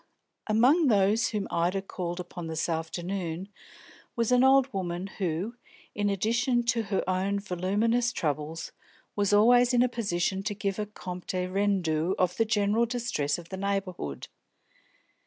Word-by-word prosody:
Among 255 +9 +4
those 210 0 +3
whom 210 -3 -3
Ida 180 +3 0
called 175 -2 -5
upon 175 -1 -6
this 160 0 -2
afternoon 170 +2 -3 0.7
was 230 0 0
an 250 0 +5
old 265 -1 +5
woman 180 -1 -3
who, 190 +6 -2 0.4
in 205 0 0
addition 235 +5 +1
to 235 -1 +1
her 195 -2 -1
own 190 +2 0
voluminous 210 +6 0
troubles, 155 - -3 0.4
was 205 -1 +1
always 245 +4 +5
in 245 - +5
a - - +3
position 195 -5 -1
to 205 +1 -3
give 200 -1 -2
a 210 - -2
compte 180 -2 -5
rendu 185 -4 +1
of 180 -1 +1
the 225 - +3
general 215 +1 +2
distress 230 - -1
of 170 -1 -11
the 190 - -5
neighbourhood. 190 - -3
195 Hz, 145 wpm, -28 LUFS, 175-230 Hz, 0.7 s, an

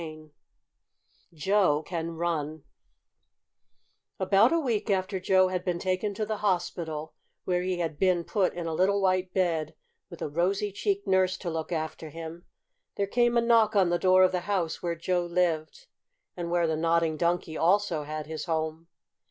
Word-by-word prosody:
CHAPTER 160 -2 -6
X 155 -1 -16 1.0
JOE 170 -2 +2
CAN 165 -1 -4
RUN 155 -3 -2 1.6
About 195 +4 +4
a 335 - +3
week 230 -7 -1
after 190 0 0
Joe 185 0 +3
had 180 -1 -2
been 180 -2 -1
taken 185 +3 -1
to 215 - -2
the 215 0 -3
hospital, 170 -5 -2 0.3
where 180 -1 +1
he 185 0 -1
had 160 -4 -3
been 180 -2 +2
put 195 0 0
in 175 -1 -4
a 165 - -2
little 195 +5 +2
white 185 -1 +1
bed, 170 -5 0 0.3
with - - -8
a - - -1
rosy 190 +7 0
cheeked 400 - -1
nurse 185 -1 +2
to 175 - -4
look 160 +1 -4
after 160 -1 -4
him, 165 +2 -9 0.5
there 200 - 0
came 240 +3 +2
a - - +4
knock 230 -2 +3
on 185 -3 +4
the 175 - +1
door 185 0 +5
of 185 - +4
the 180 - 0
house 180 -5 -1
where 170 -1 -2
Joe 175 +2 0
lived, 175 - -1 0.5
and 175 -1 -4
where 175 0 +2
the 160 -1 0
Nodding 165 0 +1
Donkey 170 -1 -1
also 175 -1 +2
had 155 +1 -5
his 155 -1 -5
home. 160 -1 -2
175 Hz, 175 wpm, -28 LUFS, 160-190 Hz, 1.6 s, door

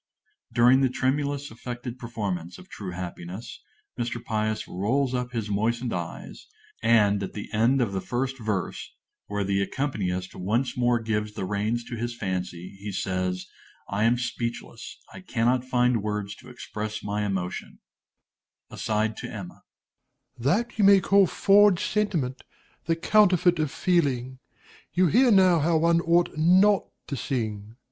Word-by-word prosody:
During 125 +3 +5
the 135 - +3
tremulous, 140 +2 -1
affected 120 +1 -7
performance 100 -8 -4
of - - -14
"True 100 -3 -7
Happiness," 90 +3 -7 0.4
Mr. 120 0 -2
Pious 110 0 -1
rolls 125 +8 0
up 125 -1 -2
his 115 -3 -3
moistened 115 +4 0
eyes; 85 -2 -6 0.3
and, 105 -3 +4
at 95 - -5
the 105 +1 -7
end 120 +5 +3
of 115 -5 0
the 95 -1 -2
first 130 +4 -2
verse, 105 -5 -3 0.3
where 105 0 -2
the 100 0 0
accompanist 100 -7 -2
once 115 +7 -1
more 120 -1 +2
gives 105 -1 -2
the 95 - -3
reins 105 +5 -1
to 120 - -7
his 120 +1 -4
fancy, 90 -2 -4
he 100 +1 -5
says, 90 -1 -2 0.4
"I 100 +2 +1
am 120 +2 +3
speechless, 120 -1 -5 0.2
I - - -9
cannot 125 -7 +1
find 125 -2 +2
words 105 -1 -3
to 130 - -14
express 110 -3 -6
my 105 +1 -2
emotion!"_) 95 -3 -3
DOMINIE - - -27 0.9
(aside 110 0 -1
to - - -5
Emma). - - -8 0.7
That 205 - 0
you - - +4
may 200 0 +8
call 195 +1 +4
forged 200 -1 +4
sentiment, 165 -12 -1 0.4
the 165 - +1
counterfeit 180 -1 +4
of 155 -2 +1
feeling. 130 -8 0 0.5
You 185 +1 +4
hear 250 - +5
now 185 -5 +5
how 160 +2 +2
one 170 +1 +3
ought 170 0 +2
not 185 +5 +5 0.2
to 140 - -4
sing. 110 -5 -3
120 Hz, 150 wpm, -26 LUFS, 105-140 Hz, 0.9 s, may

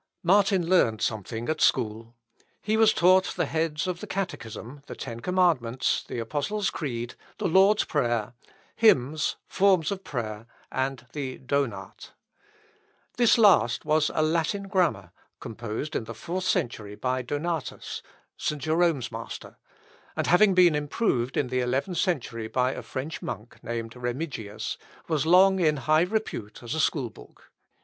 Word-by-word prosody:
Martin 190 -1 +3
learned 120 -12 +3
something 110 +2 -3
at 155 0 -1
school. 115 -2 +1 0.4
He 215 +1 -1
was 220 -1 +6
taught 185 +1 +4
the 175 - +1
heads 160 +2 -1
of 180 -2 -3
the - - -7
Catechism, 140 - -5
the - - -7
Ten 115 0 -6
Commandments, 160 -8 +1
the - - -5
Apostles' 155 - -1
Creed, 120 -5 -4 0.2
the - - -1
Lord's 195 +4 +5
Prayer, 120 -6 -1 0.4
hymns, 155 - +3
forms 190 -4 +2
of 195 -1 -4
prayer, 110 -4 -5 0.2
and 130 -1 -2
the 135 -3 -4
Donat. 140 -1 -3 1.0
This 240 0 +5
last 180 - +4
was 155 0 +2
a 155 - +3
Latin 165 +5 0
grammar, 170 - 0 0.3
composed 115 +6 -5
in 110 - -1
the 115 - -8
fourth 180 - -4
century 105 - -1
by 130 +3 -1
Donatus, 145 +4 -4 0.4
St. 150 - -2
Jerome's 155 -4 +1
master; 115 0 -8 0.6
and - - -1
having 190 +2 +5
been 180 -3 +6
improved 145 - 0
in 130 - 0
the 130 0 0
eleventh 135 +8 -1
century 120 - -1
by 125 +2 +1
a - - -6
French 140 +4 -5
monk, 110 +3 -7
named 115 -1 -4
Remigius, 120 -4 -4 0.3
was 155 -2 0
long 190 +2 +6
in 155 -4 +3
high 155 +5 +3
repute 180 - -3
as 120 - -4
a 160 - -2
school 135 -7 0
book. - - -17
145 Hz, 145 wpm, -26 LUFS, 120-180 Hz, 1.0 s, was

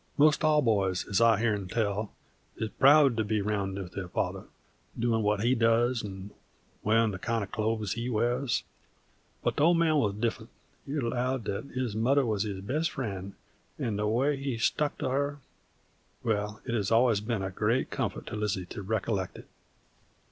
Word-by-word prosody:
'Most 150 +2 +4
all 150 -1 +4
boys, 100 -5 +1
as 100 +2 +1
I've 115 -2 +5
heern 105 -5 0
tell, 105 0 -1 0.5
is 110 - -2
proud 140 +3 +5
to 110 - +2
be 105 0 0
round 100 -2 -1
with 95 -3 -6
their 95 -1 -5
father, - - -2 0.5
doin' 115 -1 +1
what 105 -1 +1
he 120 +2 +3
does 115 0 +2
'nd 95 0 -7 0.5
wearin' 110 +1 +3
the 95 - -6
kind 115 +1 -1
of 95 - -8
clothes 110 -2 -1
he 120 +1 -3
wears. 120 +3 0 0.8
But - - 0
the 145 - +3
Old 170 +2 +5
Man 160 -2 +3
wuz 105 -6 +1
different; 115 +1 -2 0.4
he 140 - -3
allowed 125 -1 -1
that 100 +5 -3
his 125 -5 -3
mother 130 +5 +3
was 105 -3 0
his 100 -3 -3
best 150 +11 -1
friend, 100 -9 -5 0.4
'nd 105 -3 -2
the 105 - 0
way 135 +6 +1
he 135 -3 -3
stuck 145 +5 0
to - - -2
her 140 +2 0 0.9
wall, 105 -1 -1
it 120 - -3
has 105 -4 0
alwuz 115 -2 +4
been 110 -3 -2
a 95 - -3
great 115 +7 0
comfort - - -3
to - - -6
Lizzie 105 -3 -1
to - - -5
recollect 100 -2 -2
it. - - -12
115 Hz, 185 wpm, -29 LUFS, 105-125 Hz, 0.9 s, I've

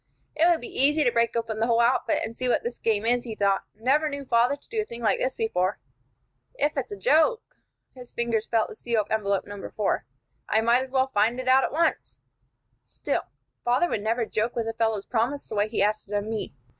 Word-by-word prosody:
"It 325 +2 +4
would 340 -2 +2
be 245 - -3
easy 295 +2 +4
to 245 - +3
break 235 0 +1
open 225 -2 -2
the 225 - +1
whole 235 -1 +3
outfit, 235 +2 +2
and 225 +1 -8
see 255 +1 -2
what - - +1
this 240 0 -5
game 220 -1 0
is," 240 +1 +2
he 225 -3 -6
thought. 200 -2 +1
"Never 275 +8 +1
knew 280 -1 -6
father 245 +2 +3
to 285 - -24
do 445 -1 -1
a - - -2
thing 235 - -8
like 215 - +2
this 260 - -1
before. 190 -3 0 0.8
If 295 +2 0
it's 270 -6 -3
a 205 - -5
joke," 320 - +3 0.5
his 250 -2 -13
fingers 230 -2 -1
felt 225 -2 +1
the - - -9
seal 230 -1 0
of 210 - -11
envelope 200 -3 0
No. 205 -1 -8
4, 210 -2 -1 0.5
"I 220 - +3
might 235 +3 +3
as 265 - -5
well 260 0 +2
find 235 -1 +1
it 255 - -5
out 260 +1 +5
at - - -1
once. 325 +3 -1 0.6
Still, - - -3 0.4
father 250 +9 +2
never 225 +3 0
would - - -9
joke 220 +3 0
with 230 -2 -2
a 225 - -2
fellow's 225 -3 0
promise 250 +5 -1
the - - -7
way 205 0 +1
he 215 -3 +1
asked 210 0 -1
it - - -1
of 205 - -1
me. 220 0 -4
235 Hz, 235 wpm, -26 LUFS, 215-260 Hz, 0.8 s, out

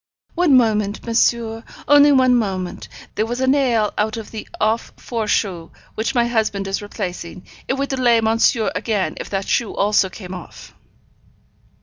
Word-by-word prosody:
'One 335 -6 +4
moment, 215 -4 +1
monsieur 230 -1 +1 0.2
only 290 0 +7
one 255 -2 +4
moment. 190 -6 -2 0.3
There 215 - 0
was 240 +2 -3
a 260 - +1
nail 255 -6 +2
out 215 +1 0
of 225 - -8
the 220 - -7
off 220 +2 0
foreshoe 205 -7 -2 0.2
which 225 +5 -2
my 240 -1 +3
husband 220 -4 -1
is 195 +1 -2
replacing; 185 -4 -6 0.2
it 265 - 0
would 275 +1 -2
delay 245 -3 +3
monsieur 225 0 +2
again 200 +1 -1
if - - -6
that 195 -1 -3
shoe 230 - 0
also 200 -1 +2
came 185 -1 -9
off.' 180 -2 -11
220 Hz, 155 wpm, -20 LUFS, 200-240 Hz, 0.3 s, only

